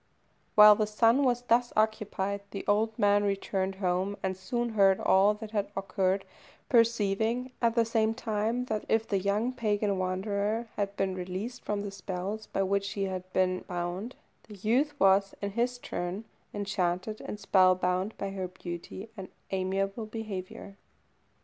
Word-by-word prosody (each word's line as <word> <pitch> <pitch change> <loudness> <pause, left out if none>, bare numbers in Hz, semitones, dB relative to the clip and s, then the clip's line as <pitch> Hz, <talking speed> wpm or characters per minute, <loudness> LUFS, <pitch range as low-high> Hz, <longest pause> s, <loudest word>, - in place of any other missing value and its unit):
While 210 0 +10
the 210 0 0
son 230 +5 +3
was 245 -2 +1
thus 245 0 +2
occupied, 210 -2 0
the 195 - -6
old 215 +2 +1
man 205 0 +4
returned 195 -1 -1
home, 190 +1 -1
and 190 0 -1
soon 240 +6 -2
heard 195 -3 +4
all 200 +2 +4
that 215 0 -9
had 205 -2 -1
occurred, 195 0 0 0.4
perceiving, 230 +1 +2
at 230 -1 +2
the 230 -1 +4
same 225 0 +1
time, 225 +1 -1
that 215 -4 -2
if 225 0 +2
the 195 - +1
young 205 +6 0
pagan 205 -4 0
wanderer 200 +4 -1
had 200 -1 -2
been 190 -1 0
released 185 +7 -5
from 205 -1 -2
the 200 - -5
spells 195 +2 -5
by 195 - -1
which 200 +1 0
she 200 0 -3
had 185 -1 -4
been 185 -1 +1
bound, 180 +6 -4 0.3
the 210 - -10
youth 260 +9 0
was, 195 0 +4
in 200 0 -3
his 240 +3 0
turn, 190 -2 -4 0.3
enchanted 195 0 -2
and 210 - -6
spellbound 185 +1 +3
by 195 -1 -3
her 190 -1 -3
beauty 180 +2 -7
and 190 -3 -7 0.2
amiable 195 +3 -1
behaviour. 200 -3 -7
200 Hz, 155 wpm, -29 LUFS, 190-220 Hz, 0.4 s, While